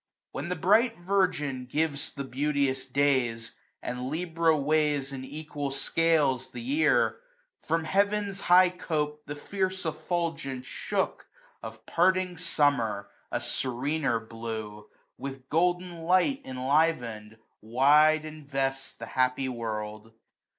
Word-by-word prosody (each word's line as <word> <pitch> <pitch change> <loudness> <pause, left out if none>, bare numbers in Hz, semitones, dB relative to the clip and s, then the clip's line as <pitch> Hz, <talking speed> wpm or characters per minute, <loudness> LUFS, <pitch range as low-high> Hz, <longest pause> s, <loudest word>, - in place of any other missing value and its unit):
When 145 +5 -5
the 180 - -1
bright 225 +7 +3
Virgin 175 -9 0
gives 150 +1 -1
the 140 - -5
beauteous 135 0 -1
days, 130 -4 +1 0.3
And 125 +1 -3
Libra 165 0 +1
weighs 145 -1 +1
in 130 -1 -5
equal 145 0 -5
scales 140 -2 +1
the - - -8
year; 280 +7 +2 0.5
From 165 +1 +1
heaven's 200 +2 +1
high 180 0 +6
cope 150 -4 -3
the 145 - -4
fierce 190 +4 -2
effulgence 160 -4 -2
shook - - -2 0.3
Of 110 0 -9
parting 185 0 +2
Summer, 140 - +1 0.2
a - - 0
serener 135 0 -1
blue, 110 -2 -7 0.3
26 - - -36
With 135 -1 -7
golden 175 +1 0
light 185 - +2
enliven'd, 125 -5 0 0.2
wide 150 +7 +4
invests 135 -3 -3
The 115 - -8
happy 130 +3 0
world. 110 -2 -5
145 Hz, 115 wpm, -28 LUFS, 130-165 Hz, 0.5 s, high